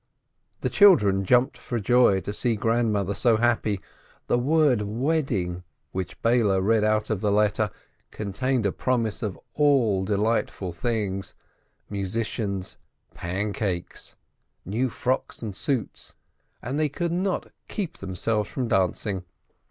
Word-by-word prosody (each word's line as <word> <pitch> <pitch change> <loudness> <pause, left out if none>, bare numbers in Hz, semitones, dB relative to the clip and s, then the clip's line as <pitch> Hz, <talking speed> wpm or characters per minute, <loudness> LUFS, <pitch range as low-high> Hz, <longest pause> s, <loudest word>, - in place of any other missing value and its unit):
The - - 0
children 105 - +5
jumped 125 +7 +3
for 120 - -3
joy 120 -3 +4
to 100 +4 -5
see 115 +1 +1
Grandmother 110 -3 +1
so 115 +2 +3
happy. 110 -3 +1 0.5
The 120 - +2
word 145 -3 +3
"wedding," 110 - -1 0.3
which 95 -2 -5
Beile 115 -5 +3
read 110 +3 +2
out 110 +1 +1
of 105 -3 -1
the 105 - +1
letter, 105 +1 +2 0.4
contained 115 +4 -1
a 100 - +2
promise 115 -3 -1
of 105 -4 -4
all 130 -10 +3
delightful 105 -2 0
things: 100 -2 -2 0.5
musicians, 100 -1 -3 0.3
pancakes, 95 0 -3 0.5
new 115 +8 0
frocks 125 +1 -2
and 105 -4 -5
suits, 130 -2 -2 0.5
and 135 +5 -2
they 155 -1 +2
could 170 +4 -2
not 185 +2 -1 0.2
keep 190 -6 -4
themselves 100 +2 -2
from 125 +8 -2
dancing. 95 -1 0
110 Hz, 125 wpm, -25 LUFS, 100-125 Hz, 0.5 s, children